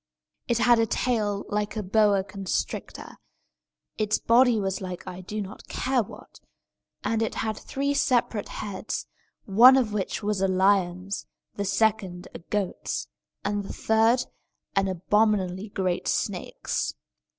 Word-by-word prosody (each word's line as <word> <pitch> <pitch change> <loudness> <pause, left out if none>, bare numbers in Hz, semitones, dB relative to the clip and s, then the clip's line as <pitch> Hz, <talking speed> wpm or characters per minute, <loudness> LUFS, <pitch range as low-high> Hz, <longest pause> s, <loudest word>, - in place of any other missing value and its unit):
It 235 - +2
had 235 0 +5
a 225 - +3
tail 210 -4 0
like 210 +1 -1
a 215 - -2
boa 200 0 +3
constrictor; 190 -1 -4 0.8
its 215 0 +2
body 240 -1 +4
was 195 -1 -2
like 180 -2 -6
I 180 +1 -7
do 210 +4 -5
not 195 +2 -11
care 255 -1 0
what; 205 - -11 0.6
and 225 0 0
it 225 - -1
had 220 -1 -1
three 280 +6 -2
separate 245 -7 +1
heads, 205 0 -4 0.4
one 240 +7 +8
of 230 -5 +1
which 205 +1 -2
was 205 -2 0
a 195 - +3
lion's, 190 0 +1 0.3
the 200 - -3
second 195 -3 0
a - - -7
goat's, 180 - -3 0.4
and 205 0 0
the - - -7
third 225 +3 +3 0.5
an 195 0 +3
abominably 190 +1 +1
great 185 -3 -1
snake's. - - -2
205 Hz, 140 wpm, -26 LUFS, 190-225 Hz, 0.8 s, one